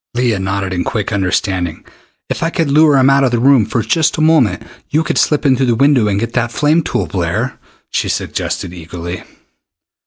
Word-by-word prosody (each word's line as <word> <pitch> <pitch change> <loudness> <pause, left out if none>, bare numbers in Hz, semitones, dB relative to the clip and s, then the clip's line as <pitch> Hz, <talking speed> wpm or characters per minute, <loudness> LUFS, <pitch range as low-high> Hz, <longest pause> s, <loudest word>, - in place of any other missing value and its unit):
Leah 120 -4 +1
nodded 95 0 -2
in 90 - -1
quick 105 -1 -3
understanding. 95 -3 -1 0.4
"If - - -4
I 165 - +1
could 165 -4 -1
lure 150 -1 +5
him 130 0 +4
out 135 0 +4
of 130 - +3
the 120 - 0
room 125 -3 +4
for 115 0 -1
just 155 +8 +1
a - - -1
moment, 145 - +2 0.3
you 155 +2 +1
could - - -1
slip 150 -1 +1
in 135 -2 +4
through 130 0 0
the 120 - +2
window 135 -3 +3
and 100 -1 0
get 115 +2 -3
that 120 -2 -1
flame 150 +7 +2
tool, - - -2
Blair," - - -3 0.3
she - - -1
suggested 85 - -3
eagerly. 85 +1 -7
120 Hz, 205 wpm, -15 LUFS, 95-140 Hz, 0.4 s, lure